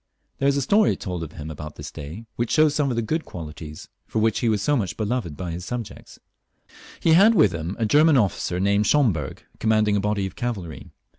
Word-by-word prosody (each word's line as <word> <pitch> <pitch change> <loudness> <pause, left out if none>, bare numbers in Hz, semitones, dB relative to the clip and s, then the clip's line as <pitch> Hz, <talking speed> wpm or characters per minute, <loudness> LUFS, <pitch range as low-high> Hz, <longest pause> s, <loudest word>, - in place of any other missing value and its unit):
There 135 - +2
is 140 0 +2
a 140 - 0
story 205 - +3
told 90 -5 -5
of 80 -3 -7
him 75 +1 -7 0.2
this 75 - -8
day, 80 +9 -8
which, 120 0 -2
shows 155 -1 +4
some 150 -2 +1
of 125 - -1
the 115 - 0
good 160 +9 -1
qualities 75 -2 -9 0.2
for - - -5
which 110 0 +2
he 120 - +1
was 105 -2 +1
so 145 +9 +1
much 100 -9 -2
beloved 110 - -2
by 90 +1 -4
his 85 +2 -5
subjects. 120 +3 -7 0.8
He 165 - +3
had 205 +7 +6
with 150 - +5
him 85 +3 -4
a 115 - 0
German 150 +6 +5
officer, 90 -4 0
named 100 +2 +2
Schomberg, 100 - +1 0.2
commanding 110 -2 +2
a - - +2
body 105 0 0
of 95 - -7
cavalry. 100 -10 -5
105 Hz, 215 wpm, -23 LUFS, 90-130 Hz, 0.8 s, had